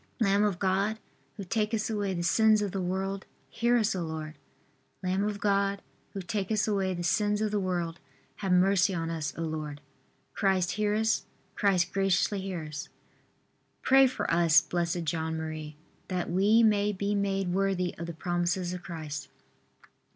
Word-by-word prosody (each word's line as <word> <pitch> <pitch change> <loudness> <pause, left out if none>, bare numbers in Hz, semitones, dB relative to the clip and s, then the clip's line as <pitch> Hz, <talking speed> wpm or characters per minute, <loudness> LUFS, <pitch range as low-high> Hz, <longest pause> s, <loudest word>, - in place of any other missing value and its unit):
Lamb 200 -2 +3
of 205 -4 +1
God, 195 +3 +1 0.4
who 200 - -5
takest 215 +2 -1
away 205 -3 -1
the 170 - -2
sins 215 +4 +4
of 200 - -2
the 195 - -2
world, 190 +2 -3 0.2
Hear 240 +1 +2
us, 220 -3 +1
O 185 - -2
Lord. 160 -1 -5 0.7
Lamb 185 +2 0
of 205 -1 -2
God, 200 -1 +1 0.3
who 195 - -5
takest 210 +2 -1
away 195 -3 0
the 175 - -4
sins 205 +4 +1
of 215 -1 0
the 210 - +1
world, 175 -3 -2 0.4
Have 195 -2 -2
mercy 190 +1 +4
on 165 -1 -2
us, 155 -3 -2
O 165 - -2
Lord. 155 -2 -4 0.5
Christ, 190 -2 +1
hear 210 0 0
us. 220 +1 +1 0.3
Christ, 185 -3 +1
graciously 195 +1 +1
hear 185 -4 -4
us. 150 -1 -6
V. - - -30 0.9
Pray 270 0 +6
for 250 - -2
us, 165 -2 +6
Blessed 175 -1 -2
John 160 0 -2
Marie, 155 -1 -5
R. 160 - -34
That 175 - -2
we 205 +6 +4
may 210 -1 +3
be 200 +1 -2
made 195 -2 0
worthy 190 -2 0
of 170 - -4
the 170 - -5
promises 175 +2 -1
of 180 - -6
Christ. 155 -5 -6
190 Hz, 175 wpm, -29 LUFS, 170-205 Hz, 0.9 s, Pray